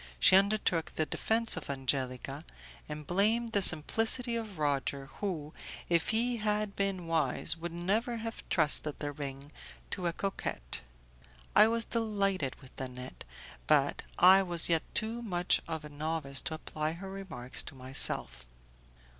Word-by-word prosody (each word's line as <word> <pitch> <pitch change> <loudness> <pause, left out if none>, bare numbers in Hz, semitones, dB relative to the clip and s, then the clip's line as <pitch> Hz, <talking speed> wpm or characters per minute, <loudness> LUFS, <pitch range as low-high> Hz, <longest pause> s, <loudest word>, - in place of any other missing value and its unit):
She 185 - +7
undertook 195 -4 +2
the 155 - 0
defence 225 +7 0
of 160 - -7
Angelica, 135 +1 -2 0.5
and 150 0 -6
blamed 220 +7 +1
the 205 - +2
simplicity 225 +9 +2
of 220 -5 -5
Roger, 140 -2 -1
who, 160 -7 -4 0.4
if 170 -2 +2
he 235 +2 +2
had 210 -1 -1
been 195 -3 -1
wise, 160 -1 +4
would 170 0 -6
never 210 +8 -1
have 225 0 -5
trusted 150 -2 +3
the 145 -1 -4
ring 140 0 -7 0.4
to 180 -3 -2
a 170 - -1
coquette. 65 - -3 0.7
I 215 - +8
was 230 0 +1
delighted 200 - -1
with 130 - -13
Nanette, 125 -1 -7 0.4
but - - +3 0.2
I 190 +2 +8
was 175 -3 +1
yet 165 -2 +3
too 225 +2 -1
much 180 -6 +1
of 160 -2 -5
a - - -8
novice 150 -2 -2
to 160 - -2
apply 155 0 -3
her 190 +3 -8
remarks 170 -11 -3
to - - -9
myself. 130 - +1
170 Hz, 145 wpm, -31 LUFS, 145-210 Hz, 0.7 s, I